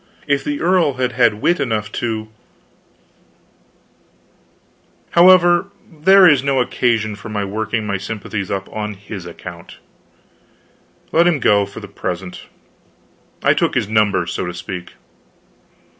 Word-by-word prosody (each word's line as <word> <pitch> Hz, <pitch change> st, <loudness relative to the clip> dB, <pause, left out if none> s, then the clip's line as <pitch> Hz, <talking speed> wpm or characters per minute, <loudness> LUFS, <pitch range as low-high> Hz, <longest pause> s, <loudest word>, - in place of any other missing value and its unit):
If 140 Hz, -1 st, 0 dB
the 145 Hz, 0 st, -3 dB
earl 175 Hz, -5 st, +2 dB
had 130 Hz, -1 st, -1 dB
had 115 Hz, -3 st, +1 dB
wit 175 Hz, -1 st, +2 dB
enough 110 Hz, -6 st, -2 dB
to 110 Hz, -2 st, -3 dB, 2.8 s
However, 175 Hz, 0 st, +5 dB, 0.2 s
there 185 Hz, +4 st, +6 dB
is 145 Hz, -5 st, +5 dB
no 135 Hz, -1 st, 0 dB
occasion 115 Hz, -4 st, 0 dB
for 105 Hz, +1 st, -10 dB
my 105 Hz, -1 st, -2 dB
working 110 Hz, +2 st, -3 dB
my 100 Hz, -2 st, -2 dB
sympathies 100 Hz, -1 st, -5 dB
up 95 Hz, -1 st, -3 dB
on 105 Hz, -1 st, -4 dB
his 100 Hz, -2 st, -9 dB
account. 85 Hz, 0 st, -10 dB, 1.3 s
Let 170 Hz, +2 st, +4 dB
him 165 Hz, -5 st, +2 dB
go, 100 Hz, -4 st, +3 dB
for 100 Hz, -, -10 dB
the 100 Hz, -, -9 dB
present; 90 Hz, -2 st, -6 dB, 1.0 s
I -, -, +5 dB
took -, -, 0 dB
his -, -, 0 dB
number, 105 Hz, -4 st, +1 dB
so 85 Hz, -, -4 dB
to 90 Hz, -, -6 dB
speak. 90 Hz, 0 st, -7 dB
110 Hz, 130 wpm, -18 LUFS, 100-140 Hz, 2.8 s, there